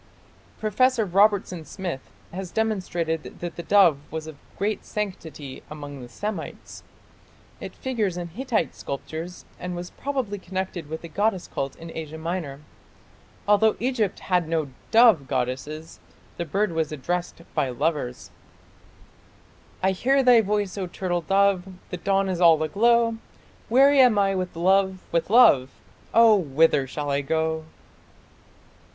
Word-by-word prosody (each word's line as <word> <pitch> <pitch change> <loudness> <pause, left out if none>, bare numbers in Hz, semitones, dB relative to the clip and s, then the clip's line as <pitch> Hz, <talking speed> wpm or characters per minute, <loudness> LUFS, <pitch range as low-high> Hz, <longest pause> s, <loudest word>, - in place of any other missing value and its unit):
Professor 225 +2 +2
Robertson 195 -2 +2
Smith 175 -5 -6 0.2
has 185 0 -5
demonstrated 175 -7 -2
that 175 -1 -5
the - - -5
dove 175 -5 +5
was 160 0 -5
of 160 -1 -9 0.2
great 210 +2 -1
sanctity 160 -9 -6
among 145 -2 -8
the 120 - -10
Semites. 205 - -6 0.8
It - - -8
figures 220 -9 -2
in 175 -1 -5
Hittite 225 - -1
sculptures 160 +5 -7
and 180 0 -5
was 175 +1 -6
probably 260 -8 -3
connected 185 -4 -5
with 160 +1 -6
the - - -6
goddess 195 +2 -1
cult 135 -1 -4
in 165 0 -10
Asia 160 -1 -6
Minor. 160 -4 -4 0.9
Although 210 +1 +4
Egypt 235 -5 -1
had 180 -3 +1
no 160 -3 -1 0.2
dove 220 - +6
goddess, 135 +5 -3 0.4
the 170 - -3
bird 195 +5 0
was 160 -2 -1
addressed 170 +4 -3
by 135 - 0
lovers 140 -1 -2 1.5
I 190 - +4
hear 270 +8 +2
thy 245 -2 +7
voice, 205 -2 -1
O 185 - -2
turtle 175 -1 -2
dove 195 +2 +2 0.2
The 180 - -3
dawn 195 +2 +1
is 185 -2 -2
all 165 -2 +6
aglow 230 +6 +3 0.5
Weary 275 +4 +5
am 250 -5 +6
I 195 -1 +3
with 185 -2 -3
love, 190 +2 +2
with 170 +1 0
love, 210 - +6 0.4
Oh, 230 -1 +7
whither 150 -4 +2
shall 145 +2 -4
I 140 0 +1
go? 160 +2 -1
180 Hz, 140 wpm, -25 LUFS, 160-210 Hz, 1.5 s, thy